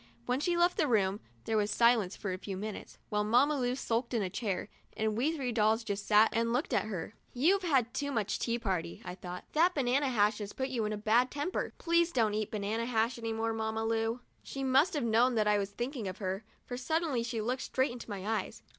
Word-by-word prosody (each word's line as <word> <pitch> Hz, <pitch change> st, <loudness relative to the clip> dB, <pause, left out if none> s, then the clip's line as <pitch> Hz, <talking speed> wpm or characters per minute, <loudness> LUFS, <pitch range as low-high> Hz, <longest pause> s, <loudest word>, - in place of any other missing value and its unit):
When 250 Hz, +1 st, 0 dB
she 345 Hz, +3 st, 0 dB
left 350 Hz, +1 st, +3 dB
the 320 Hz, -6 st, +2 dB
room, 205 Hz, -4 st, +2 dB, 0.3 s
there 220 Hz, -, +1 dB
was 205 Hz, -1 st, +1 dB
silence 225 Hz, -3 st, +3 dB
for 195 Hz, -3 st, -4 dB
a 185 Hz, -, -5 dB
few 195 Hz, -1 st, -5 dB
minutes, 210 Hz, +1 st, -6 dB
while 210 Hz, 0 st, +1 dB
Mamma 250 Hz, +8 st, +4 dB
Lu 250 Hz, 0 st, 0 dB
sulked 240 Hz, -1 st, -1 dB
on 220 Hz, -, +1 dB
a 185 Hz, -, -3 dB
chair, 200 Hz, -5 st, -2 dB, 0.3 s
and 215 Hz, -1 st, 0 dB
we 260 Hz, +8 st, +1 dB
three 270 Hz, -6 st, -2 dB
dolls 220 Hz, 0 st, +2 dB
just 200 Hz, -2 st, -4 dB
sat 215 Hz, +1 st, +6 dB
and 230 Hz, +1 st, +1 dB
looked 250 Hz, +6 st, 0 dB
at -, -, +2 dB
her. 200 Hz, -2 st, -5 dB, 0.2 s
"You've 345 Hz, +11 st, +3 dB
had 265 Hz, -9 st, +1 dB
too 285 Hz, +1 st, -2 dB
much 215 Hz, -6 st, -1 dB
tea 235 Hz, 0 st, 0 dB
party," 185 Hz, -7 st, -3 dB
I -, -, -5 dB
thought. 180 Hz, -1 st, -7 dB
"That 345 Hz, +4 st, +4 dB
banana 270 Hz, 0 st, +2 dB
hash 210 Hz, -3 st, +2 dB
has 205 Hz, -1 st, -6 dB
put 265 Hz, 0 st, -2 dB
you 235 Hz, -4 st, -1 dB
in 210 Hz, -, -2 dB
a -, -, -3 dB
bad 230 Hz, +4 st, +3 dB
temper. 295 Hz, +7 st, -3 dB
Please 340 Hz, 0 st, +2 dB
don't 225 Hz, -7 st, +2 dB
eat 215 Hz, 0 st, -1 dB
banana 215 Hz, +2 st, -2 dB
hash 230 Hz, 0 st, 0 dB
any 225 Hz, -1 st, -3 dB
more, 225 Hz, 0 st, -1 dB
Mamma 220 Hz, 0 st, -2 dB
Lu." 225 Hz, +2 st, 0 dB, 0.2 s
She 275 Hz, -, -6 dB
must 270 Hz, +6 st, +3 dB
have 290 Hz, -, 0 dB
known 235 Hz, +2 st, +3 dB
that 215 Hz, -1 st, +2 dB
I 210 Hz, -1 st, +4 dB
was 200 Hz, -1 st, -2 dB
thinking 240 Hz, +1 st, -4 dB
of 185 Hz, +1 st, -5 dB
her, 190 Hz, +1 st, -3 dB, 0.2 s
for 245 Hz, -, -5 dB
suddenly 300 Hz, 0 st, 0 dB
she 230 Hz, -1 st, -3 dB
looked 250 Hz, +4 st, -1 dB
straight 260 Hz, 0 st, 0 dB
into 240 Hz, -1 st, -9 dB
my 200 Hz, -2 st, -5 dB
eyes. 220 Hz, 0 st, -2 dB
230 Hz, 235 wpm, -31 LUFS, 210-260 Hz, 0.3 s, sat